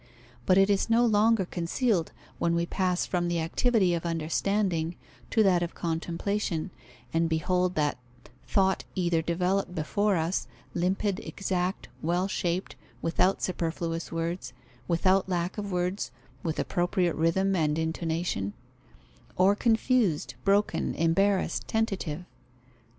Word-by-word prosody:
But 185 Hz, -, +5 dB
it 195 Hz, +1 st, +5 dB
is 200 Hz, +3 st, +1 dB
no 235 Hz, +1 st, +4 dB
longer 220 Hz, -2 st, +3 dB
concealed, 175 Hz, +2 st, 0 dB, 0.3 s
when 170 Hz, 0 st, +2 dB
we 170 Hz, 0 st, +1 dB
pass 180 Hz, 0 st, 0 dB
from 175 Hz, -1 st, -1 dB
the 175 Hz, -1 st, 0 dB
activity 190 Hz, +3 st, +2 dB
of 170 Hz, -, -1 dB
understanding 170 Hz, +1 st, 0 dB, 0.3 s
to 220 Hz, -, +3 dB
that 185 Hz, -3 st, +4 dB
of 175 Hz, 0 st, -3 dB
contemplation, 170 Hz, +2 st, -2 dB, 0.4 s
and 165 Hz, 0 st, +2 dB
behold 180 Hz, +3 st, +1 dB
that 150 Hz, -4 st, 0 dB, 0.5 s
thought 190 Hz, -1 st, +2 dB
either 175 Hz, -3 st, +1 dB
developed 180 Hz, +3 st, 0 dB
before 200 Hz, +6 st, +1 dB
us, 165 Hz, +2 st, -1 dB, 0.3 s
limpid, 190 Hz, +3 st, 0 dB
exact, 185 Hz, -3 st, -2 dB
well 175 Hz, +4 st, +1 dB
shaped, 180 Hz, -1 st, -2 dB, 0.3 s
without 180 Hz, +3 st, +2 dB
superfluous 165 Hz, -1 st, -2 dB
words, 165 Hz, -5 st, -3 dB, 0.3 s
without 185 Hz, +3 st, +2 dB
lack 180 Hz, +2 st, -1 dB
of 205 Hz, -1 st, -4 dB
words, 180 Hz, +2 st, -1 dB, 0.3 s
with 160 Hz, -2 st, -2 dB
appropriate 175 Hz, -1 st, +1 dB
rhythm 190 Hz, +5 st, +2 dB
and 155 Hz, -3 st, +1 dB
intonation; 160 Hz, -, -2 dB, 0.8 s
or 190 Hz, +2 st, +4 dB
confused, 220 Hz, -, +2 dB
broken, 200 Hz, +1 st, +1 dB
embarrassed, 190 Hz, +4 st, +1 dB
tentative. 190 Hz, -7 st, -1 dB
180 Hz, 125 wpm, -28 LUFS, 165-195 Hz, 0.8 s, But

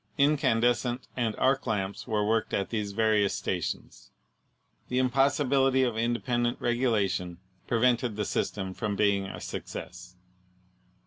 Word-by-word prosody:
Incandescent 125 Hz, -4 st, +2 dB
and 115 Hz, -4 st, -1 dB
arc 135 Hz, 0 st, +1 dB
lamps 100 Hz, -1 st, -2 dB
were 105 Hz, -3 st, 0 dB
worked 110 Hz, +1 st, 0 dB
at 100 Hz, -, -2 dB
these 105 Hz, -3 st, -2 dB
various 105 Hz, -1 st, +2 dB
stations. -, -, -4 dB, 0.8 s
The 125 Hz, -, -2 dB
impossibility 135 Hz, 0 st, +3 dB
of 120 Hz, -3 st, 0 dB
independent 120 Hz, +1 st, 0 dB
regulation 105 Hz, -8 st, 0 dB, 0.3 s
pre 115 Hz, -2 st, 0 dB
vented 125 Hz, -2 st, +2 dB
the 105 Hz, 0 st, -2 dB
system 95 Hz, -1 st, -2 dB
from 105 Hz, 0 st, -3 dB
being 100 Hz, -1 st, +2 dB
a -, -, -7 dB
success. 90 Hz, +1 st, -7 dB
115 Hz, 125 wpm, -28 LUFS, 105-125 Hz, 0.8 s, impossibility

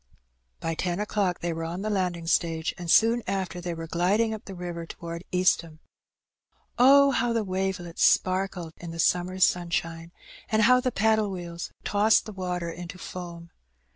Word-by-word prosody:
By 165 Hz, -, -2 dB
ten 175 Hz, +2 st, -2 dB
o'clock 205 Hz, -3 st, -1 dB
they 170 Hz, -1 st, -1 dB
were 165 Hz, 0 st, -4 dB
on 170 Hz, +4 st, -4 dB
the 215 Hz, -, -2 dB
landing 180 Hz, -4 st, -1 dB
stage, 165 Hz, -1 st, 0 dB
and 175 Hz, -1 st, -7 dB
soon 230 Hz, +6 st, +5 dB
after 185 Hz, -2 st, -3 dB
they 175 Hz, -1 st, -4 dB
were 165 Hz, 0 st, -6 dB
gliding 195 Hz, +7 st, +1 dB
up 220 Hz, +1 st, -8 dB
the 195 Hz, -, -8 dB
river 175 Hz, -2 st, -6 dB
towards 170 Hz, +1 st, -7 dB
Eastham. 180 Hz, -3 st, +1 dB, 1.0 s
Oh, 280 Hz, +2 st, +7 dB
how 240 Hz, -2 st, +1 dB
the 230 Hz, -1 st, 0 dB
wavelets 185 Hz, -3 st, -2 dB
sparkled 185 Hz, -3 st, +1 dB
in 170 Hz, -, -8 dB
the 165 Hz, -, -7 dB
summer's 180 Hz, +2 st, +1 dB
sunshine, 170 Hz, -2 st, 0 dB, 0.4 s
and 220 Hz, 0 st, +3 dB
how 250 Hz, +3 st, +6 dB
the 255 Hz, 0 st, -1 dB
paddle 220 Hz, -1 st, +2 dB
wheels 175 Hz, -2 st, -6 dB
tossed 210 Hz, +1 st, +3 dB
the 215 Hz, -, -8 dB
water 180 Hz, -3 st, -3 dB
into 175 Hz, +1 st, -8 dB
foam 170 Hz, -2 st, -8 dB
180 Hz, 170 wpm, -26 LUFS, 170-205 Hz, 1.0 s, Oh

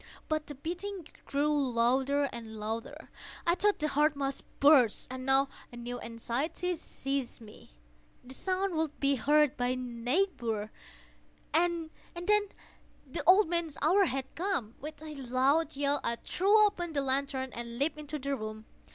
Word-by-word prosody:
But 310 Hz, -1 st, -1 dB
the 290 Hz, -, -7 dB
beating 355 Hz, +5 st, -5 dB, 0.2 s
grew 290 Hz, +2 st, +1 dB, 0.2 s
louder, 265 Hz, +4 st, +2 dB
louder! 225 Hz, 0 st, -6 dB, 0.4 s
I 340 Hz, -, +4 dB
thought 410 Hz, +3 st, +2 dB
the 305 Hz, -, 0 dB
heart 300 Hz, +1 st, +3 dB
must 275 Hz, -1 st, -3 dB
burst. 275 Hz, -6 st, +5 dB
And 255 Hz, 0 st, -6 dB
now 270 Hz, +1 st, +4 dB, 0.2 s
a 240 Hz, -, -10 dB
new 245 Hz, +1 st, -5 dB
anxiety 250 Hz, +10 st, -2 dB
seized 275 Hz, -4 st, -4 dB
me—the -, -, -16 dB
sound 375 Hz, +5 st, -1 dB
would 315 Hz, -2 st, -2 dB
be 280 Hz, 0 st, +3 dB
heard 295 Hz, +2 st, +3 dB
by 245 Hz, -, +1 dB
a 255 Hz, -, +1 dB
neighbour! 240 Hz, -, -1 dB, 0.8 s
The 335 Hz, -1 st, +1 dB, 1.4 s
old 380 Hz, +2 st, +7 dB
man's 340 Hz, -3 st, -2 dB
hour 375 Hz, +7 st, +4 dB
had 270 Hz, -3 st, -3 dB
come! 330 Hz, -, -1 dB
With 305 Hz, +2 st, -7 dB
a 310 Hz, -1 st, -6 dB
loud 275 Hz, +5 st, +1 dB
yell, 285 Hz, +1 st, +1 dB
I 235 Hz, -, 0 dB
threw 410 Hz, -, +4 dB
open 350 Hz, -5 st, -2 dB
the 280 Hz, -2 st, 0 dB
lantern 265 Hz, -1 st, -1 dB
and 235 Hz, 0 st, -6 dB
leaped 305 Hz, +3 st, 0 dB
into 300 Hz, 0 st, -5 dB
the 280 Hz, 0 st, -2 dB
room. 215 Hz, -2 st, -6 dB
280 Hz, 145 wpm, -31 LUFS, 245-320 Hz, 1.4 s, old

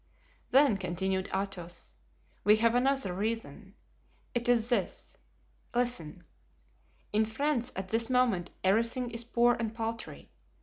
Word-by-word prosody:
"Then," 270 Hz, -5 st, +5 dB
continued 190 Hz, +1 st, -1 dB
Athos, 190 Hz, -3 st, -4 dB, 0.5 s
"we 210 Hz, +1 st, +6 dB
have 230 Hz, +1 st, +3 dB
another 255 Hz, -5 st, +2 dB
reason; 225 Hz, +4 st, -3 dB, 0.6 s
it 240 Hz, 0 st, -1 dB
is 235 Hz, -2 st, +3 dB
this—listen: 210 Hz, -2 st, -4 dB, 0.9 s
In 215 Hz, +1 st, +4 dB
France 245 Hz, +2 st, -1 dB
at 190 Hz, 0 st, -4 dB
this 225 Hz, +2 st, 0 dB
moment 240 Hz, -9 st, +2 dB
everything 230 Hz, +5 st, +1 dB
is 230 Hz, 0 st, -4 dB
poor 240 Hz, +1 st, +3 dB
and 225 Hz, -2 st, -3 dB
paltry. 230 Hz, 0 st, -5 dB
225 Hz, 115 wpm, -30 LUFS, 190-240 Hz, 0.9 s, we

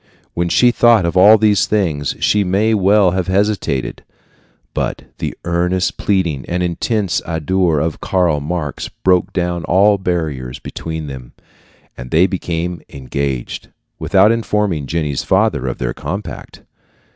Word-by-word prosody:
When 85 Hz, 0 st, -1 dB
she 120 Hz, +7 st, +4 dB
thought 120 Hz, -6 st, +4 dB
of 85 Hz, -, -2 dB
all 105 Hz, +4 st, +7 dB
these 105 Hz, -2 st, +2 dB
things, 80 Hz, -10 st, -1 dB
she 105 Hz, -1 st, +2 dB
may 100 Hz, +4 st, +1 dB
well 100 Hz, -2 st, +4 dB
have 90 Hz, -1 st, -2 dB
hesitated; 95 Hz, -, -1 dB, 0.7 s
but -, -, -3 dB, 0.2 s
the -, -, -4 dB
earnest 90 Hz, +2 st, 0 dB
pleading 85 Hz, -9 st, 0 dB
and 90 Hz, +1 st, -1 dB
intense 95 Hz, +2 st, -1 dB
ardor 85 Hz, 0 st, 0 dB
of 80 Hz, +1 st, -2 dB
Karl 90 Hz, -5 st, +1 dB
Marx 75 Hz, 0 st, -4 dB
broke 90 Hz, -1 st, +1 dB
down 90 Hz, -2 st, -2 dB
all 100 Hz, +3 st, +3 dB
barriers 75 Hz, -9 st, -3 dB
between 80 Hz, -1 st, -6 dB
them, 65 Hz, -4 st, -9 dB, 0.6 s
and 60 Hz, 0 st, -9 dB
they 80 Hz, +6 st, +4 dB
became 90 Hz, -2 st, -3 dB
engaged, 65 Hz, -1 st, -4 dB, 0.3 s
without 100 Hz, +2 st, +4 dB
informing 105 Hz, -9 st, -1 dB
Jenny's 75 Hz, -3 st, -2 dB
father 65 Hz, -, +1 dB
of 65 Hz, -, -3 dB
their -, -, -3 dB
compact. 100 Hz, +3 st, -7 dB
90 Hz, 135 wpm, -17 LUFS, 75-100 Hz, 0.7 s, all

